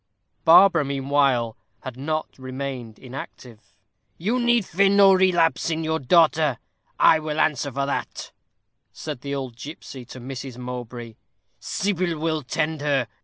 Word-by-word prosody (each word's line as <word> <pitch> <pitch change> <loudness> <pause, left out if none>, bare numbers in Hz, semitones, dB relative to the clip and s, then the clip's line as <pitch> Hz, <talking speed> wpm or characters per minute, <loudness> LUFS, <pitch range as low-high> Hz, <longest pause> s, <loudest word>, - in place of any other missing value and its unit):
Barbara, 170 0 +7
meanwhile, 135 -4 +1 0.3
had 130 -2 -7
not 155 +2 -4
remained 130 -3 -6
inactive. 125 -3 -11 0.5
"You 220 +9 -1
need 240 -3 +2
fear 195 +3 +2
no 200 -1 +6
relapse 175 -4 +2
in 160 0 -2
your 160 0 -1
daughter; 155 -2 +3 0.4
I 160 - +6
will 155 0 -4
answer 145 -3 +1
for 140 +2 -2
that," 140 - -4 0.6
said 125 - -7
the 140 0 -4
old 130 -4 -5
gipsy 135 0 -9
to 130 - -11
Mrs. 130 0 -7
Mowbray; 120 -2 -7 0.4
"Sybil 185 -4 -1
will 155 0 -1
tend 155 +3 -2
her. 140 -4 0
145 Hz, 135 wpm, -23 LUFS, 130-165 Hz, 0.6 s, Barbara